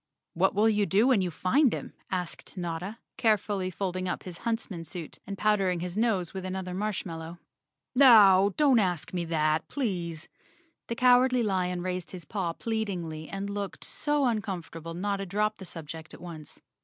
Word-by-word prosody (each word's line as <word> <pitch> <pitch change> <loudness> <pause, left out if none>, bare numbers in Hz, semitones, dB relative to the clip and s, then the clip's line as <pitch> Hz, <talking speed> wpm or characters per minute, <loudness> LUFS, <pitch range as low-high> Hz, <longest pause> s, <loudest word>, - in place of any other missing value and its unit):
"What 190 +3 +2
will 210 +2 +4
you 210 -2 +2
do 205 +4 +4
when 240 -7 +4
you 180 - 0
find 235 - +3
him?" - - -5 0.2
asked 180 +1 -4
Notta, 175 +4 -4 0.2
carefully 205 -4 +1
folding 185 0 -3
up - - -3
his 180 -2 -8
huntsman 225 -7 -3
suit 165 -1 -7
and 200 0 -5
powdering 195 -4 +2
his 175 +1 -4
nose 210 -6 +1
with 190 -1 -5
another 185 -1 -4
marshmallow. 175 -4 -4 0.6
"Now, 205 -7 +7
don't 280 -5 +5
ask 180 -5 -1
me 175 -1 -1
that, 155 -1 +1
please." 175 - -3 0.6
The 235 - -3
Cowardly 250 0 +5
Lion 180 -3 0
raised 180 -1 -3
his 180 -4 -8
paw 175 -1 -2
pleadingly 180 -8 -3
and 195 0 -4
looked 200 -1 -4
so 295 -1 0
uncom¬ 210 -7 -1
fortable 165 0 -8
Notta 195 +1 -2
dropped 210 +3 0
the 190 - -8
subject 160 -2 -8
at - - -15
once. 165 -4 -9
190 Hz, 165 wpm, -28 LUFS, 175-215 Hz, 0.6 s, Now